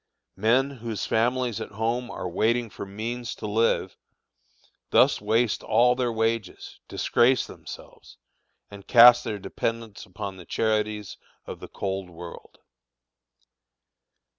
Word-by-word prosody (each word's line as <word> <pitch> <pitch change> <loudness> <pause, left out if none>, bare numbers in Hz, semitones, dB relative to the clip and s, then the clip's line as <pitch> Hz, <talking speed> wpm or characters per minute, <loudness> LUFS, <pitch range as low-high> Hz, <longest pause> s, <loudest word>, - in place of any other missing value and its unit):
Men 125 +7 +2
whose 115 -5 -5
families 120 0 0
at - - -7
home 115 +3 -2
are - - -5
waiting 115 +5 0
for 100 - -8
means 115 +4 -5
to - - -8
live, 110 +2 +1 0.9
thus - - +4
waste 110 +2 +1
all 120 +3 +3
their 125 -1 -1
wages, 115 -3 -2
disgrace 125 +2 +2
themselves, - - -12 0.5
and 100 -1 -12
cast 120 0 +8
their 110 -3 -3
dependents 115 +2 -4
upon 95 +1 -7
the 90 - -12
charities 105 -1 -1 0.3
of - - -8
the - - -9
cold 95 -2 -4
world. 85 0 -11
110 Hz, 120 wpm, -25 LUFS, 100-120 Hz, 0.9 s, cast